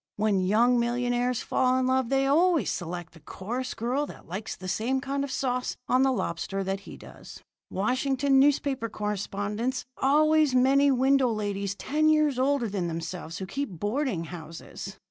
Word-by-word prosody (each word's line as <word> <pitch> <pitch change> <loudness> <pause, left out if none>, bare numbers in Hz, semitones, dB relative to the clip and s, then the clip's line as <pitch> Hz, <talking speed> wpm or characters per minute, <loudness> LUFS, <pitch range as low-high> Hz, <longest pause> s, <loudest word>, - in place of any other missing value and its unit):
When 210 -2 +1
young 235 +6 +3
millionaires 245 0 0
fall 255 0 +2
in 260 - +1
love, 260 -2 +1
they 270 0 +2
always 330 +3 +3
select 175 -1 -5
the 165 - -15
chorus 245 - -5
girl 255 +6 -1
that - - -12
likes 190 +6 -5
the 185 - -9
same 240 +8 0
kind 275 +1 -2
of 280 - -4
sauce 255 -1 -2
on 255 - +3
the 265 0 +4
lobster 195 -3 -2
that 195 +1 -2
he - - -11
does. - - -12 0.3
Washington 265 +6 +1
newspaper 275 -4 +2
correspondents 210 +4 -3
always 305 0 +3
many 275 +3 +4
widow 265 -1 +3
ladies 200 -2 -2
ten 310 +8 +1
years 305 -4 +3
older 270 -2 +2
than 195 -4 -2
themselves 165 0 -5
who 190 - -5
keep 275 +9 -3
boarding 205 - -2
houses. 170 +3 -9
245 Hz, 165 wpm, -27 LUFS, 200-270 Hz, 0.3 s, the